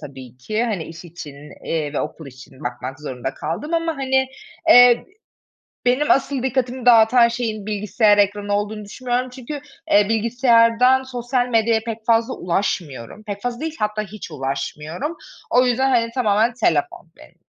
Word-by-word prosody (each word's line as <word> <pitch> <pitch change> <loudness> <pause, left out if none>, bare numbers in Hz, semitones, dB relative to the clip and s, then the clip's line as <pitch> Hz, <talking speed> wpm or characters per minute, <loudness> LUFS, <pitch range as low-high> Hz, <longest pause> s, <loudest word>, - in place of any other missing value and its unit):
tabii 130 -4 -11
ki 215 - -2
hani, 200 -9 -2
iş 165 +2 -11
için, 160 -4 -10 0.3
eee, 155 -3 -2
ve - - -1
okul 155 0 -6
için 130 0 -14
bakmak 125 +3 -5
zorunda 135 -2 -5
kaldığım 185 - -4
ama 330 -1 -1
hani, 265 -1 +1 0.4
eee, - - +8
e 245 -1 +7 0.8
benim 255 +5 +2
asıl 270 -1 +2
dikkatimi 255 -1 -2
dağıtan 235 0 +6
şeyin 225 -3 -4
bilgisayar 210 0 +2
ekranı 205 0 +1
olduğunu 210 +1 -3
düşünmüyorum 250 +4 -3
çünkü, 265 +3 -7 0.3
eee, 205 0 +5
bilgisayardan 235 +2 +3
sosyal 245 -1 -2
medyaya 225 -1 +2
pek 225 -1 -5
fazla 230 +2 +2
ulaşmıyorum. 170 - -3
Pek 205 -2 -7
fazla 245 0 -3
değil, 320 0 -4
hatta 215 0 -1
hiç 210 -3 -9
ulaşmıyorum. 150 - -4 0.3
O 250 +1 +4
yüzden 255 +2 +2
hani, 230 -2 +2
tamamen 225 -1 +2
telefon 165 - -1
benim. - - -18
220 Hz, 155 wpm, -21 LUFS, 170-245 Hz, 0.8 s, eee